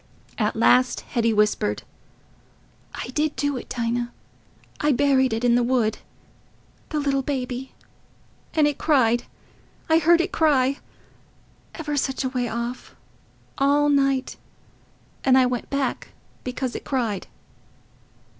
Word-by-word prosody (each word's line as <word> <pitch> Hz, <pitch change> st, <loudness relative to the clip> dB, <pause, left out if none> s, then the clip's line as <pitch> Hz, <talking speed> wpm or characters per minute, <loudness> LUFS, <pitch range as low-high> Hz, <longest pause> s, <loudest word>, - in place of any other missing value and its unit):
At 210 Hz, -1 st, 0 dB
last 250 Hz, +3 st, +3 dB
Hetty 230 Hz, -2 st, 0 dB
whispered, 210 Hz, -, +1 dB, 1.1 s
"I -, -, -5 dB
did 300 Hz, +3 st, -1 dB
do 285 Hz, +1 st, -1 dB
it, 250 Hz, -, -7 dB
Dinah... 240 Hz, 0 st, -2 dB, 0.7 s
I 295 Hz, -1 st, +2 dB
buried 265 Hz, -1 st, +3 dB
it 225 Hz, +2 st, -2 dB
in 240 Hz, -1 st, +4 dB
the 245 Hz, -, +4 dB
wood... 235 Hz, -3 st, +1 dB, 0.9 s
the 305 Hz, -, -1 dB
little 280 Hz, -2 st, +1 dB
baby... 260 Hz, -1 st, -4 dB, 0.8 s
and 305 Hz, -2 st, +4 dB
it 295 Hz, -, -2 dB
cried... 240 Hz, -6 st, +2 dB, 0.7 s
I 320 Hz, -, +6 dB
heard 335 Hz, +1 st, +5 dB
it 350 Hz, +3 st, 0 dB
cry... 275 Hz, -4 st, +2 dB, 1.0 s
ever 300 Hz, -3 st, -3 dB
such 270 Hz, -1 st, -1 dB
a 260 Hz, -, 0 dB
way 250 Hz, -1 st, -2 dB
off... 235 Hz, +2 st, -5 dB, 0.6 s
all 290 Hz, +1 st, +3 dB
night... 275 Hz, -2 st, +1 dB, 0.9 s
and 260 Hz, -1 st, +5 dB
I 260 Hz, -, +5 dB
went 250 Hz, -1 st, -3 dB
back 275 Hz, -2 st, -2 dB, 0.4 s
because 255 Hz, 0 st, -3 dB
it -, -, -5 dB
cried." 230 Hz, -8 st, -2 dB
260 Hz, 125 wpm, -24 LUFS, 240-285 Hz, 1.1 s, I